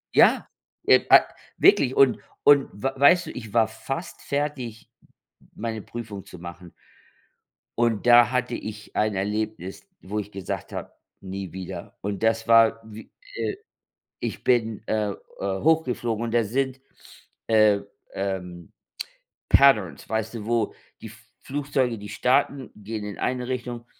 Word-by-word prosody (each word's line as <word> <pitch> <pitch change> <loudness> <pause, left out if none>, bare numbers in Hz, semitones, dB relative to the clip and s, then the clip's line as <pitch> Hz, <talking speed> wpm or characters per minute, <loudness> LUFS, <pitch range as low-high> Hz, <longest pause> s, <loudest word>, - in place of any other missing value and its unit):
Ja, - - +5 0.4
äh, - - +6
ah, - - +9 0.3
wirklich. 130 -2 +5
Und 130 -4 +5 0.2
und 145 -1 +6
w 100 - -14
weißt 145 +6 +5
du, - - -5
ich 110 -4 -9
war 115 -2 +4
fast 135 - -6
fertig, 140 -6 -4 0.7
meine 110 -1 -4
Prüfung 105 -3 -8
zu 90 - -12
machen. 85 0 -10 1.0
Und 115 -3 +1
da 120 -1 +7
hatte 125 -1 -1
ich 105 -1 -8
ein 105 -1 +1
Erlebnis, 105 - -3
wo 105 +3 -4
ich 105 0 -6
gesagt 95 -2 -5
habe: - - -6 0.3
„Nie 95 -1 -6
wieder.“ 95 -1 -8
Und 100 -1 -4
das 115 0 +1
war 115 0 +5
w 110 0 -10
äh, - - -19 1.1
ich - - -4
bin, 115 -4 +1
äh 105 -1 0 0.3
äh, 95 0 -2
hochgeflogen 125 -8 +1
und 115 - -3
da 120 -1 +3
sind, 130 +4 -2 0.7
äh, 110 -2 +5 0.3
ähm, 90 -3 -5 0.8
Patterns, 105 - +4
weißt 110 +1 -2
du, 110 -2 -6
wo 115 -2 0 0.3
die - - -7
F 110 +1 -14 0.2
Flugzeuge, 135 -4 -1
die 105 0 -9
starten, 130 +5 +1
gehen 105 +1 -6
in 105 - -6
eine 125 -1 -1
Richtung, 120 -2 -4
110 Hz, 145 wpm, -25 LUFS, 105-125 Hz, 1.1 s, ah